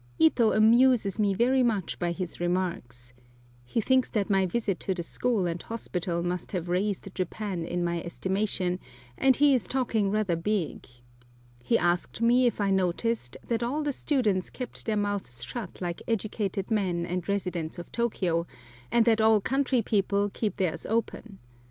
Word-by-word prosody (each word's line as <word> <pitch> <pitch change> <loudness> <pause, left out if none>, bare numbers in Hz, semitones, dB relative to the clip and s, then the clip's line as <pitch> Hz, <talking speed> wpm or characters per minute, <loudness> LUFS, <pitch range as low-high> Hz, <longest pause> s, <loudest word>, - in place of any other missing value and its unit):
Ito 215 +8 +4
amuses 225 -2 +4
me 200 -2 +2
very 255 +5 +3
much 220 -7 0
by 175 -1 0
his 180 0 -5
remarks. 170 -9 -3 0.5
He 120 - -2
thinks 260 +3 +2
that 210 -2 -1
my 195 -1 +3
visit 200 -1 -1
to 190 - -2
the 175 - -3
school 225 +1 0
and 170 0 -2
hospital 180 -6 -3
must 175 +1 -3
have 175 -2 -3
raised 195 +1 -1
Japan 185 -1 -3
in 175 +1 -2
my 170 -1 -1
estimation, 190 0 -1 0.4
and 265 - +4
he 285 +1 +5
is 240 -8 +1
talking 230 -6 0
rather 205 -4 +1
big. 180 0 -2 0.7
He 120 - +2
asked 175 +3 0
me 245 +2 +4
if 235 - -1
I 200 -1 +1
noticed 190 - 0
that 230 -1 0
all 275 +6 -1
the 290 -1 -1
students 220 -11 0
kept 250 -2 -7
their 215 -1 +1
mouths 200 -13 -2
shut 205 - -7
like 175 -1 -3
educated 210 -2 -2
men 180 -5 0
and 180 +1 -4
residents 180 -5 -2
of 175 - -8
Tôkiyô, 180 -8 0 0.4
and 235 -1 +4
that 225 -2 +4
all 220 -1 +5
country 260 +1 +1
people 200 -1 +1
keep 215 -3 -2
theirs 170 -4 -1
open. 225 -2 -2
200 Hz, 165 wpm, -28 LUFS, 175-230 Hz, 0.7 s, he